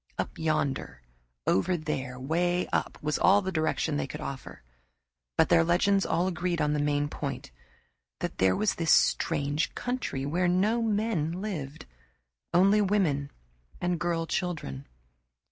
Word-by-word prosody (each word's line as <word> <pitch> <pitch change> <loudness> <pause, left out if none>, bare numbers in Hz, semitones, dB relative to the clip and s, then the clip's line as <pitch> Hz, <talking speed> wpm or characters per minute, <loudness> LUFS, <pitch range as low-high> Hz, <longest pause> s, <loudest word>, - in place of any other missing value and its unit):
"Up - - -4
yonder," 140 - -1 0.4
"Over 175 - +2
there," 135 -5 -4
"Way 175 +6 0
up" - - -1
was 150 0 0
all 200 +2 +5
the 190 - -2
direction 155 -2 0
they 140 - -2
could 150 +3 -7
offer, 135 - -7 0.7
but 160 - +4
their 165 - +5
legends 190 +4 +2
all 170 +2 +1
agreed 175 -1 -1
on 150 -1 +1
the 150 - 0
main 145 0 +1
point 140 - -5 0.7
that - - -4
there 95 0 +4
was 215 -3 +1
this 165 -2 -2
strange 145 -1 +2
country 245 - -3
where 175 +5 +1
no 205 +6 +2
men 210 -7 0
lived 170 -7 -5 0.7
only 195 +4 +5
women 180 -9 +1 0.5
and 175 -1 -1
girl 165 0 -1
children. 160 - -3
165 Hz, 145 wpm, -28 LUFS, 145-185 Hz, 0.7 s, all